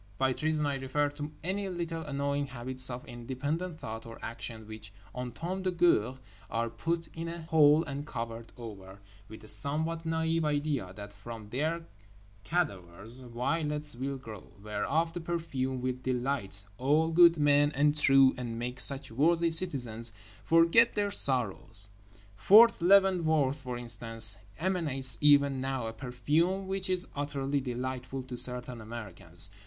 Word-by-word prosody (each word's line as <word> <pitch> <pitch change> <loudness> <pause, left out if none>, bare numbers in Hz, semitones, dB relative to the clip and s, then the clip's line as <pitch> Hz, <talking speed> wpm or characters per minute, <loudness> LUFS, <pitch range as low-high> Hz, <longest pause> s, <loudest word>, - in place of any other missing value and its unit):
By 130 0 +1
treason 155 +1 -1
I 140 -1 -1
refer 145 +2 -1
to 145 +1 -7
any 195 +3 -2
little 170 -2 -4
annoying 140 -1 -2
habits 130 0 -1
of 125 +3 -7
independent 140 +7 -4
thought 115 -6 -7
or 115 - -10
action 115 -1 -7
which 110 -1 -10 0.2
en 125 0 -4
temps 180 +9 -5
de 185 - +1
guerre 170 - +2 0.3
are 115 +1 -2
put 165 +8 -3
in 165 +1 -6
a 170 0 -6
hole 155 -1 +4
and 145 -1 -6
covered 115 -3 -6
over, 100 -5 -10 0.3
with 110 -1 -11
the 110 - -14
somewhat 160 +6 -1
naïve 160 0 0
idea 145 -9 -1
that 100 0 -9
from 105 0 -10
their 160 +6 -2 0.6
cadavers 110 - -3
violets 150 +4 -2
will 135 +2 -4
grow, 110 -7 -11
whereof 140 +11 -1
the 175 - -4
perfume 140 -7 -3
will 130 0 -3
delight 125 -6 -3 0.2
all 150 +5 +2
good 170 0 +6
men 145 0 +3
and 145 +1 +2
true 135 -3 +5
and 115 -2 -5
make 125 +2 -5
such 135 -1 +2
worthy 165 +7 +2
citizens 125 -10 +2 0.3
forget 165 +8 +4
their 205 -1 0
sorrows. 115 - +1 0.5
Fort 215 - +6
Leavenworth, 170 -7 +3
for 125 -2 -5
instance, 115 -3 +5 0.2
emanates 145 -9 +1
even 140 -2 +4
now 130 -2 -3
a 110 - -5
perfume 150 +10 -1
which 190 0 -3
is 185 -1 +2
utterly 140 -1 -2
delightful 130 +1 -5
to 125 -1 -8
certain 125 -1 -2
Americans. 100 -5 -1
135 Hz, 150 wpm, -30 LUFS, 120-160 Hz, 0.6 s, good